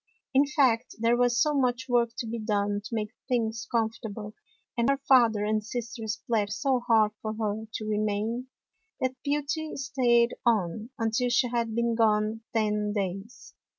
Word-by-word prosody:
In 275 +2 +5
fact, 255 -5 +2
there 230 +1 +3
was 245 0 +2
so 300 +4 +3
much 255 -2 0
work 240 -2 +3
to - - -3
be 230 +1 -4
done 205 -1 0
to 230 - -4
make 210 -1 -2 0.2
things 225 -3 -1
comfortable, 220 -2 -2 0.4
and 235 +2 +1
her 275 - +3
father 240 -6 +4
and 215 0 0
sisters 225 -1 -5
plead 215 -3 +1
so 265 +3 +1
hard 220 -3 +3
for 215 0 -3
her 220 0 -2
to 215 - -4
remain, 215 +3 -1 0.5
that 260 0 0
Beauty 295 +2 -2
stayed 250 -3 +2
on, 215 -1 +1
until 225 +2 0
she 245 +1 +2
had 235 -2 -1
been 235 0 +1
gone 220 -1 +2
ten 210 -2 0
days. 195 +3 -5
230 Hz, 160 wpm, -28 LUFS, 215-245 Hz, 0.5 s, In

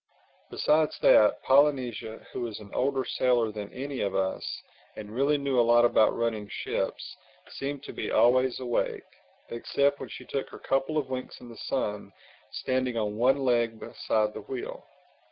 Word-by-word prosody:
Besides 155 0 +2
that, 105 - +5
Polynesia, 130 -6 +2
who - - -4
was 115 -3 -4
an 105 -2 -13
older 135 0 0
sailor 120 -3 +1
than 105 -1 -7
any 135 +1 -5
of 100 -1 -1
us, 95 0 -2 0.3
and 105 -1 -8
really 140 +4 +2
knew 140 -3 0
a - - +7
lot 120 0 +5
about 110 -2 +3
running 115 -3 -1
ships, - - -3 0.3
seemed 140 0 -5
to - - -8
be - - -4
always 130 +1 +3
awake—except 130 +2 -2
when - - -7
she - - -9
took 135 - -3
her - - -10
couple 135 +3 -1
of 135 -3 -2
winks 130 0 -5
in 120 - -12
the 115 - -11
sun, 105 -6 -2 0.4
standing 130 -2 -1
on 105 -2 -1
one 130 +4 +2
leg 120 -2 +1
beside 105 -1 -1
the - - -7
wheel. 415 +6 -6
125 Hz, 165 wpm, -28 LUFS, 110-135 Hz, 0.4 s, a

